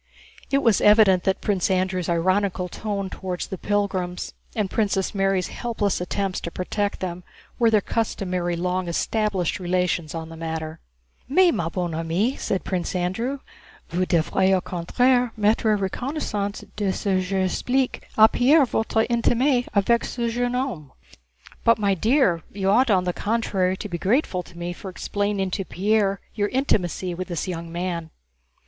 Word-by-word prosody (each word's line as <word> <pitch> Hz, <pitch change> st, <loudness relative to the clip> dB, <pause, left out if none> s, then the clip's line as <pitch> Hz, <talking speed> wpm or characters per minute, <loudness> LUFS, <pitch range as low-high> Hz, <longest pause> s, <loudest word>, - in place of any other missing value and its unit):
It 275 Hz, 0 st, +2 dB
was 225 Hz, -4 st, +4 dB
evident 210 Hz, -4 st, +5 dB
that 190 Hz, -, +1 dB
Prince 195 Hz, -3 st, 0 dB
Andrew's 185 Hz, -2 st, 0 dB
ironical 185 Hz, +2 st, +1 dB
tone 200 Hz, +1 st, -3 dB
toward 180 Hz, -2 st, -5 dB
the 190 Hz, -, -4 dB
pilgrims 190 Hz, -3 st, -1 dB, 0.2 s
and 210 Hz, -3 st, 0 dB
Princess 195 Hz, -2 st, 0 dB
Mary's 195 Hz, -2 st, +1 dB
helpless 215 Hz, -6 st, -2 dB
attempts 195 Hz, +1 st, -2 dB
to -, -, -4 dB
protect 200 Hz, +4 st, -2 dB
them 180 Hz, -1 st, -4 dB, 0.4 s
were 230 Hz, -1 st, +5 dB
their 215 Hz, -2 st, +4 dB
customary 185 Hz, -6 st, -1 dB
long 180 Hz, +1 st, -1 dB
established 195 Hz, 0 st, 0 dB
relations 180 Hz, -3 st, -1 dB
on 160 Hz, 0 st, -5 dB
the 165 Hz, -, -9 dB
matter. 160 Hz, 0 st, -5 dB, 0.5 s
"Mais, 360 Hz, +5 st, +5 dB
ma 165 Hz, -1 st, -1 dB
bonne 175 Hz, -2 st, -3 dB
amie," 165 Hz, -, 0 dB
said 190 Hz, -, -2 dB
Prince 180 Hz, -1 st, -2 dB
Andrew, 230 Hz, +10 st, -2 dB, 0.5 s
"vous 180 Hz, +1 st, 0 dB
devriez 190 Hz, +3 st, +2 dB
au -, -, +2 dB
contraire 245 Hz, +8 st, +1 dB
m'être 215 Hz, +2 st, +2 dB
reconnaissante 205 Hz, -1 st, -3 dB
de 205 Hz, -2 st, 0 dB
ce -, -, -5 dB
que 190 Hz, -2 st, +2 dB
j'explique 195 Hz, +8 st, -1 dB
à 220 Hz, 0 st, +9 dB
Pierre 280 Hz, +4 st, +5 dB
votre 220 Hz, -1 st, 0 dB
intimité 245 Hz, +2 st, +2 dB
avec 230 Hz, +4 st, +3 dB
ce 235 Hz, -1 st, -2 dB
jeune 245 Hz, +1 st, -1 dB
homme." 215 Hz, -, -3 dB, 0.7 s
"But, 230 Hz, -, +5 dB
my 200 Hz, -2 st, +2 dB
dear, 205 Hz, -, +2 dB
you 195 Hz, -1 st, 0 dB
ought 245 Hz, +4 st, +4 dB
on 190 Hz, -3 st, +4 dB
the 180 Hz, -1 st, -1 dB
contrary 195 Hz, -4 st, 0 dB
to 210 Hz, -, -5 dB
be 175 Hz, -3 st, -4 dB
grateful 200 Hz, -, +1 dB
to 175 Hz, -1 st, -15 dB
me 175 Hz, +1 st, -4 dB
for 190 Hz, -, -8 dB
explaining 200 Hz, +1 st, -2 dB
to 195 Hz, -, -2 dB
Pierre 200 Hz, +2 st, +1 dB
your 205 Hz, -2 st, 0 dB
intimacy 190 Hz, -, 0 dB
with 185 Hz, +2 st, -5 dB
this 175 Hz, +1 st, -3 dB
young 170 Hz, -2 st, -5 dB
man." 170 Hz, -1 st, -3 dB
195 Hz, 160 wpm, -24 LUFS, 180-220 Hz, 0.7 s, à